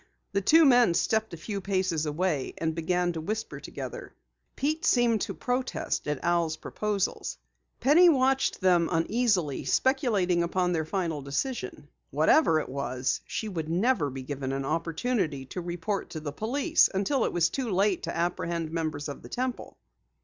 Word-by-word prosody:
The 200 Hz, -, 0 dB
two 320 Hz, -, +6 dB
men 245 Hz, -9 st, +5 dB
stepped 220 Hz, +3 st, +1 dB
a 170 Hz, -, -7 dB
few 200 Hz, +4 st, -5 dB
paces 185 Hz, -5 st, 0 dB
away 150 Hz, -2 st, -1 dB
and 160 Hz, -1 st, -1 dB
began 175 Hz, +2 st, 0 dB
to 160 Hz, -, -4 dB
whisper 215 Hz, +7 st, -4 dB
together. -, -, -8 dB, 0.4 s
Pete 310 Hz, +4 st, -1 dB
seemed 235 Hz, -4 st, +3 dB
to -, -, -3 dB
protest 250 Hz, -8 st, -2 dB
at 150 Hz, -2 st, -2 dB
Al's 170 Hz, -2 st, +1 dB
proposals. 210 Hz, -2 st, -2 dB, 0.4 s
Penny 315 Hz, +8 st, +6 dB
watched 270 Hz, -2 st, +2 dB
them 175 Hz, -3 st, +3 dB
uneasily, 180 Hz, -, +1 dB
speculating 215 Hz, -, +2 dB
upon 180 Hz, +1 st, 0 dB
their 160 Hz, -3 st, 0 dB
final 165 Hz, -3 st, -2 dB
decision. 140 Hz, -, -4 dB, 0.2 s
Whatever 165 Hz, -, +4 dB
it -, -, -5 dB
was, 130 Hz, -1 st, -2 dB
she 220 Hz, -, -3 dB
would 165 Hz, -6 st, -4 dB
never 180 Hz, -, +1 dB
be 130 Hz, 0 st, -7 dB
given 135 Hz, 0 st, -4 dB
an 135 Hz, 0 st, -2 dB
opportunity 165 Hz, -, -1 dB
to 180 Hz, +7 st, -6 dB
report 175 Hz, +4 st, -3 dB
to 160 Hz, -, -6 dB
the 150 Hz, -2 st, -6 dB
police 280 Hz, -, +2 dB
until 205 Hz, +7 st, 0 dB
it -, -, 0 dB
was 165 Hz, -2 st, +2 dB
too 260 Hz, -4 st, -2 dB
late 195 Hz, 0 st, +1 dB
to -, -, -4 dB
apprehend 170 Hz, -1 st, -2 dB
members 155 Hz, -3 st, -3 dB
of 145 Hz, -, -7 dB
the -, -, -12 dB
Temple. 255 Hz, 0 st, -4 dB
180 Hz, 165 wpm, -28 LUFS, 160-235 Hz, 0.4 s, two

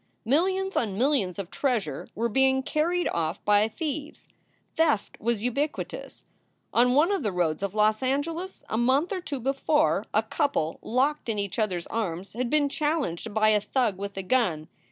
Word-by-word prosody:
Millions 375 Hz, -, +1 dB
on 205 Hz, -5 st, 0 dB
millions 245 Hz, -, +1 dB
of 195 Hz, -2 st, -6 dB
treasure 220 Hz, -, -1 dB
were 230 Hz, +3 st, 0 dB
being 265 Hz, +3 st, +3 dB
carried 345 Hz, +6 st, 0 dB
off 160 Hz, -2 st, -2 dB
by 210 Hz, +1 st, +4 dB
thieves. 300 Hz, +4 st, -5 dB, 0.5 s
Theft 310 Hz, -10 st, +1 dB
was 230 Hz, -1 st, -1 dB
ubiquitous. 280 Hz, +5 st, -3 dB, 0.5 s
On 245 Hz, +1 st, +4 dB
one 320 Hz, +7 st, +4 dB
of 395 Hz, -, 0 dB
the 210 Hz, -, -1 dB
roads 175 Hz, -3 st, 0 dB
of 200 Hz, 0 st, -3 dB
Los 215 Hz, +1 st, +3 dB
Angeles, 325 Hz, +8 st, -2 dB
a 220 Hz, -, -1 dB
month 270 Hz, -, +2 dB
or 370 Hz, -, -3 dB
two 290 Hz, -5 st, -4 dB
before, 275 Hz, +4 st, +1 dB
a -, -, +2 dB
couple 280 Hz, -, -1 dB
locked 260 Hz, +3 st, 0 dB
in 220 Hz, -, -1 dB
each 200 Hz, +2 st, -3 dB
other 210 Hz, -5 st, +1 dB
s 170 Hz, -, -6 dB
arms 190 Hz, -4 st, -3 dB
had 240 Hz, +2 st, -2 dB
been 300 Hz, 0 st, +3 dB
challenged 280 Hz, -, -1 dB
by 215 Hz, +1 st, +3 dB
a 210 Hz, -1 st, +3 dB
thug 215 Hz, -3 st, 0 dB
with 200 Hz, 0 st, -5 dB
a 195 Hz, -, -3 dB
gun. 185 Hz, -8 st, +1 dB
245 Hz, 175 wpm, -27 LUFS, 205-295 Hz, 0.5 s, by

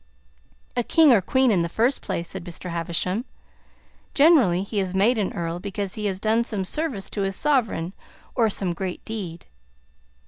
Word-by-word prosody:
"A 245 Hz, -, +2 dB
king 305 Hz, +3 st, +5 dB
or 210 Hz, -, +4 dB
queen, 260 Hz, +5 st, +2 dB
in 185 Hz, -5 st, +3 dB
the 170 Hz, -, -1 dB
first 235 Hz, +9 st, +1 dB
place," 170 Hz, -4 st, -3 dB
said 190 Hz, -2 st, -5 dB
Mr. 175 Hz, 0 st, -7 dB
Havisham. 170 Hz, +5 st, -1 dB, 0.9 s
"Generally, 270 Hz, -, +5 dB
he 205 Hz, +1 st, -2 dB
is 190 Hz, -1 st, -2 dB
made 220 Hz, +5 st, +3 dB
an 200 Hz, -, 0 dB
earl 170 Hz, 0 st, -3 dB
because 200 Hz, 0 st, -4 dB
he 210 Hz, -1 st, -2 dB
has 190 Hz, -2 st, -2 dB
done 220 Hz, +3 st, +2 dB
some 205 Hz, -5 st, -3 dB
service 265 Hz, -, -2 dB
to 205 Hz, -, -3 dB
his 195 Hz, 0 st, 0 dB
sovereign, 225 Hz, -, 0 dB, 0.4 s
or 230 Hz, -3 st, +2 dB
some 190 Hz, -3 st, -1 dB
great 180 Hz, +1 st, -5 dB
deed." 185 Hz, -7 st, -6 dB
200 Hz, 175 wpm, -24 LUFS, 180-235 Hz, 0.9 s, king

